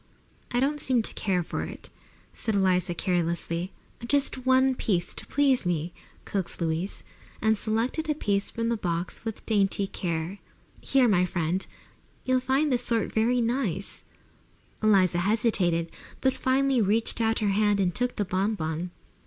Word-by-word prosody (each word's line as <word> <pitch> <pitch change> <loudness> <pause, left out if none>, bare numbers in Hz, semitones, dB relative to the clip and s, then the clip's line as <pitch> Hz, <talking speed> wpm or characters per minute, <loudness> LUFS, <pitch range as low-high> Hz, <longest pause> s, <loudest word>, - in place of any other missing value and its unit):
"I 245 - 0
don't 290 +3 +1
seem 250 -4 +2
to - - 0
care 185 -4 0
for - - -4
it," - - -8 0.4
said 220 - -1
Eliza 180 -3 +2
carelessly. 170 0 -1 0.4
"Just 270 -1 0
one 260 0 +5
piece, 185 -8 -1
to - - -5
please 275 -3 +3
me," 170 -1 -1 0.3
coaxed 195 -3 -2
Louise, 165 +3 -2 0.4
and 220 0 +3
selected 230 +9 -1
a 300 - +2
piece 200 -8 0
from 230 0 -2
the 235 - 0
box 175 -3 -3
with 225 -2 -6
dainty 200 -2 +2
care. 175 0 -3 0.4
"Here, 265 -2 +3
my 180 -4 +3
dear; 175 0 -1 0.7
you'll 255 0 +3
find 265 +4 +1
this 245 -1 +1
sort 230 -3 0
very 240 +3 +2
nice." 230 - -2 0.8
Eliza 190 -5 +4
hesitated, 180 -5 +1 0.3
but 265 0 +2
finally 265 -1 +2
reached 220 +3 +1
out 225 0 +2
her 210 -2 +1
hand 205 0 +2
and 180 -2 +1
took 245 +4 0
the 205 - -1
bon 190 +4 0
bon. 160 0 -3
210 Hz, 155 wpm, -27 LUFS, 180-245 Hz, 0.8 s, one